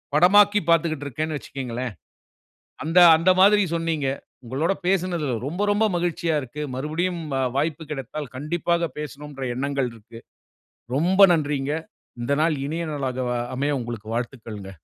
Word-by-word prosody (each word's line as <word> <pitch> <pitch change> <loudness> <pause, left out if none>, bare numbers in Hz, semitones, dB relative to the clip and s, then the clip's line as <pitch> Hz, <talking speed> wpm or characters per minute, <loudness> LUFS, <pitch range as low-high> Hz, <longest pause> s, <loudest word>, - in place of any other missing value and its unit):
படமாக்கிப் 205 +3 +5
பாத்துகிட்டு 160 -3 +2
இருக்கேனு 155 +3 -3
வச்சுக்கோங்களேன். 125 -4 -5 0.9
அந்த, 165 +4 +3 0.2
அந்த 165 +3 +2
மாரி 205 +1 +6
சொன்னீங்க. 165 -4 -1 0.4
உங்களோடு 150 +10 0
பேசுனதுல 175 -7 0
ரொம்ப, 175 +7 -3
ரொம்ப 210 +2 +3
மகிழ்ச்சியா 170 -2 0
இருக்கு. 145 +4 -6
மறுபடியும் 165 +6 -2 0.4
வாய்ப்பு 155 +3 -1
கிடைத்தால், 145 +1 -5
கண்டிப்பாக 170 +3 0
பேசணும்ன்ற 145 -1 -6
எண்ணங்கள் 140 -1 -1
இருக்கு. 115 +1 -13 0.8
ரொம்ப 180 +6 +2
நன்றிங்க. 145 -3 -1 0.5
இந்த 120 - -1
நாள் 160 -1 +2
இனிய 165 +3 -3
நாளாக 130 -3 -2 0.3
அமைய 145 +2 0
உங்களுக்கு 115 -3 -6
வாழ்த்துக்கள்ங்க. 115 -5 -5
150 Hz, 120 wpm, -24 LUFS, 135-170 Hz, 0.9 s, மாரி